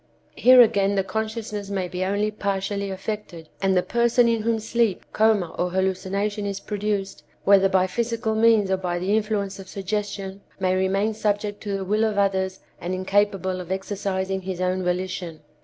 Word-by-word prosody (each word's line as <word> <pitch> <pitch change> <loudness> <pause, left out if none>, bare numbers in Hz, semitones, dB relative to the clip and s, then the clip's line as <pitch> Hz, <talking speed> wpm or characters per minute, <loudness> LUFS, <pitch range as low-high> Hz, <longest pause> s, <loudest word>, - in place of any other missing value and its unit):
Here 255 0 +7
again 200 -4 +3
the 195 - +2
consciousness 215 -1 -4
may 190 -2 -2
be 180 +1 -3
only 205 +3 0
partially 200 -1 -2
affected, 190 -4 -6
and 190 -1 +2
the 180 - +3
person 235 0 +3
in 230 -1 +1
whom 230 +1 +1
sleep, 220 -2 0
coma 215 -6 +2
or 180 - +1
hallucination 190 +3 -1
is 200 -1 -3
produced, 205 -2 -3 0.2
whether 195 -1 +5
by 190 -1 +3
physical 230 +3 -1
means 220 -3 +4
or 190 - +2
by 180 -2 -2
the 190 +4 0
influence 210 -3 -1
of 190 - -10
suggestion, 200 0 -4 0.2
may 185 -1 +1
remain 195 +3 +1
subject 205 -1 -1
to 200 -2 -2
the 190 - -4
will 210 +3 +1
of 215 -2 0
others 190 -1 0 0.2
and 180 +2 -3
incapable 190 -1 0
of 180 0 -8
exercising 190 0 -2
his 185 -1 -5
own 185 0 0
volition." 180 -2 -3
195 Hz, 175 wpm, -24 LUFS, 190-215 Hz, 0.2 s, Here